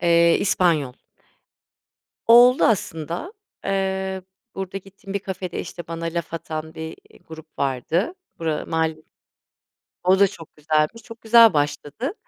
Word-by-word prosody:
Eee, 170 -1 +4
İspanyol. 165 -9 +2 1.4
Oldu 245 +2 +7
aslında. 170 - -1 0.3
Eee, 190 -1 -1 0.3
burada 195 0 -4
gittiğim 195 +1 -11
bir 200 - 0
kafede, 185 -2 -5
işte 175 - -7
bana 165 0 -5
laf 170 0 -3
atan 160 -1 -5
bir, 160 0 -7
eee, - - -20
grup 160 0 -10
vardı. 140 - 0 0.3
Bura 160 -2 -2
mahal 160 -1 0 1.1
o 190 +1 +5
da 200 - +6
çok 165 -6 -13
güzelmiş, 155 +8 0
çok 225 +1 -12
güzel 230 -1 +7
başladı. 145 - -2
170 Hz, 125 wpm, -23 LUFS, 160-195 Hz, 1.4 s, Oldu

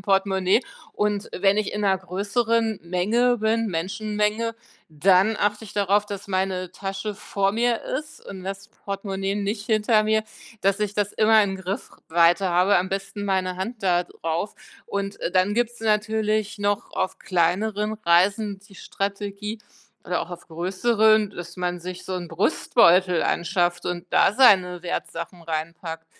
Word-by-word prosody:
Portemonnaie. 195 +2 +2 0.3
Und 210 0 -1
wenn 195 +2 +3
ich 210 -1 -2
in 210 - -2
'ner 190 -2 +2
größeren 220 +4 0
Menge 215 +8 +2
bin, 225 +1 +1
Menschenmenge, 210 +5 -1 0.3
dann 185 +7 +3
achte 210 +2 0
ich - - -12
darauf, 205 +1 +2
dass 200 -1 -7
meine 185 -1 -2
Tasche 195 +2 -4
vor 195 0 -1
mir 235 +1 +1
ist 300 +3 -6
und 190 -2 -8
das 195 +1 -6
Portemonnaie 195 -1 -4
nicht 205 +1 -3
hinter 215 0 +3
mir, 220 0 +2 0.4
dass 195 +1 +2
ich 205 -1 -1
das 205 -1 0
immer 220 0 +5
in 195 -1 -1
Griffweite 180 -2 +1
habe, 180 +3 +4
am 185 +1 -1
besten 195 +1 -4
meine 185 -2 0
Hand 215 +3 -5
da 175 -2 +2
drauf. 165 +5 -4 0.3
Und, 200 0 -4
äh, - - -2
dann 185 +2 +2
gibt's 240 +1 -1
natürlich 215 0 0
noch 205 0 -1
auf 185 - -1
kleineren 195 +4 0
Reisen 200 +4 +3
die 195 0 -19
Strategie 200 +3 -4 0.5
oder 180 - -1
auch 170 - -6
auf 175 -1 -9
größeren, 210 +5 +2
dass 175 -3 -9
man 180 -1 -2
sich 180 +1 -7
so 190 - -5
'n 175 -2 -5
Brustbeutel 180 0 +3
anschafft 175 0 0
und 175 -1 -3
da - - +4
seine 185 -9 +5
Wertsachen 170 0 -5
reinpackt 165 0 -5
195 Hz, 150 wpm, -24 LUFS, 180-210 Hz, 0.5 s, immer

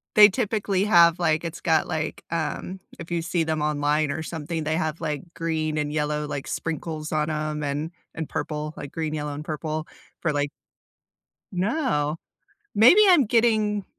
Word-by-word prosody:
They 210 -1 +10
typically 205 -3 0
have 170 -4 +6
like, 160 -2 +1
it's 165 -1 -6
got, 160 -2 +2
like, 160 -1 -3
um, 170 +3 -3 0.2
if 170 - -9
you 170 -1 0
see 170 0 0
them 160 -1 -1
online 150 0 +1
or 160 - -3
something, 160 0 -4
they 155 +1 0
have, 160 -1 -2
like, 150 -4 -2
green 160 -2 -1
and 150 -1 -1
yellow, 150 0 -1
like, 140 -2 -5
sprinkles 155 -1 -4
on 155 0 0
'em 150 0 -2
and 145 +3 -2 0.2
and 160 -2 -4
purple, 150 0 -4
like 145 - -8
green, 160 -2 -3
yellow, 150 -1 -3
and 150 - -7
purple 155 0 -3 0.3
for 160 -3 0
like 145 0 0 1.0
No, 180 - 0 0.6
maybe 245 - +8
I'm 345 -8 +6
getting 215 -3 +2
160 Hz, 165 wpm, -25 LUFS, 150-175 Hz, 1.0 s, They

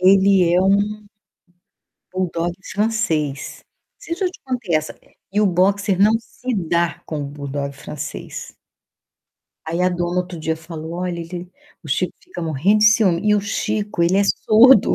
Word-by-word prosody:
ele 190 -1 +5
é 180 - +4
um 205 +2 +1 1.0
buldogue 175 -2 -1 0.2
francês. 165 -10 -1 0.3
Não - - -54
sei 335 - -4
se 385 - -2
eu - - +3
já - - -13
te - - -15
contei 245 -9 -2
essa 155 0 -4
e - - -28 0.2
e 205 - +2
o 210 - +4
boxer 195 +1 +2
não 210 +2 +6
se 250 +2 -5
dá 170 -3 0
com 155 -2 -4
o - - -4
buldogue 140 0 -5
francês. 145 +1 -7 1.1
Aí 165 +2 -2
a 180 - +4
dona 175 0 -1
outro 180 -1 -7
dia 160 0 -1
falou: 160 0 -8
"Olha, 175 -1 -3
ele 175 +1 -7 0.3
o - - -11
Chico - - 0
fica 360 - -9
morrendo 165 +7 +2
de 215 - +5
ciúme". 210 -5 +4
E 210 - +5
o 205 - +2
Chico, 210 -2 -2
ele 175 +3 +3
é - - +4
surdo. 220 +3 +5
180 Hz, 175 wpm, -20 LUFS, 165-210 Hz, 1.1 s, não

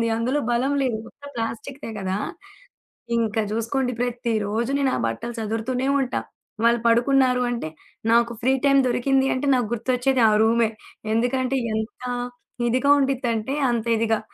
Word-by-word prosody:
పడిపోతుంది. 230 - +1
అందులో 250 +6 0
బలం 250 +4 +1
లేదు. 250 -4 0
ఒక్క 285 - -20
ప్లాస్టిక్‌దే 230 +4 -5
కదా! 190 -1 -2 1.0
ఇంకా 225 -1 0
చూసుకోండి, 250 +3 -1
ప్రతిరోజు 235 -2 -1
నేను 275 -2 +2
ఆ - - -2
బట్టలు 115 - -4
సర్దుతుతూనే 225 +4 -2
ఉంటా. 260 -1 -1 0.4
వాళ్లు 235 0 +4
పడుకున్నారు, 250 +1 +3
అంటే 235 -10 -3 0.4
నాకు 235 0 +4
ఫ్రీ 260 +3 +3
టైమ్ 275 -1 +5
దొరికింది 265 +2 +2
అంటే, 255 +3 -2
నాకు 245 -4 0
గుర్తొచ్చేది 250 +2 +1
ఆ - - +2
రూమే. 230 0 +3 0.4
ఎందుకంటే, 255 +3 +1 0.2
ఎంత 220 +3 -4 0.7
ఇదిగా 255 +4 +2
ఉండిద్దంటే, 260 -2 -1
అంత 235 -1 -1
ఇదిగా. 225 -1 +1
240 Hz, 140 wpm, -23 LUFS, 225-260 Hz, 1.0 s, టైమ్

